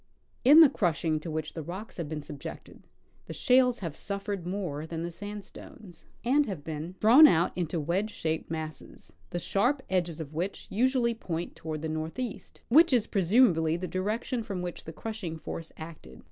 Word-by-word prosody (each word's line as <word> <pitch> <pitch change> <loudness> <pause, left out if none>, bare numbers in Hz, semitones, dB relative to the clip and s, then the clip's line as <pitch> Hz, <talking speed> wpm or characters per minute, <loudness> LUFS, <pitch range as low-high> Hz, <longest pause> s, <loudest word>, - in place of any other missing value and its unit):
In 290 +6 +9
the 310 - +9
crushing 160 - 0
to 165 - -7
Avhich 155 -1 -4
the 165 - -5
rocks 185 +8 -7
have 165 -4 -4
been 155 -2 -4
subjected 145 -2 -9 0.4
the - - -6
shales 250 -3 +3
have 165 -5 -4
suffered 200 -2 -4
more 175 -6 -3
than 165 0 -4
the 170 - -4
sandstones, 205 0 -10 0.2
and 285 +4 +3
have 185 -8 -5
been 160 +3 -5
draAvn 260 +8 +9
out 170 +2 +2
into 170 -2 -2
Avedge 175 +8 0
shaped 160 -6 -3
masses, 155 -1 -7 0.2
the - - -3
sharp 245 +10 +1
edges 175 -3 0
of 155 -3 -6
Avhich 175 +5 -3
usually 245 +1 +2
point 175 -6 -4
toAvard 155 -1 -5
the 160 - -2
northeast, 160 +10 -5
Avhich 320 +2 +7
is 235 -4 +4
presumably 175 -5 +3
the 180 +1 -4
direction 215 +7 -2
from 200 -5 -4
Avhich 175 -1 -6
the 160 - -6
crushing 190 -2 -5
force 160 +1 -7
acted. 160 - -10
180 Hz, 175 wpm, -29 LUFS, 160-220 Hz, 0.4 s, In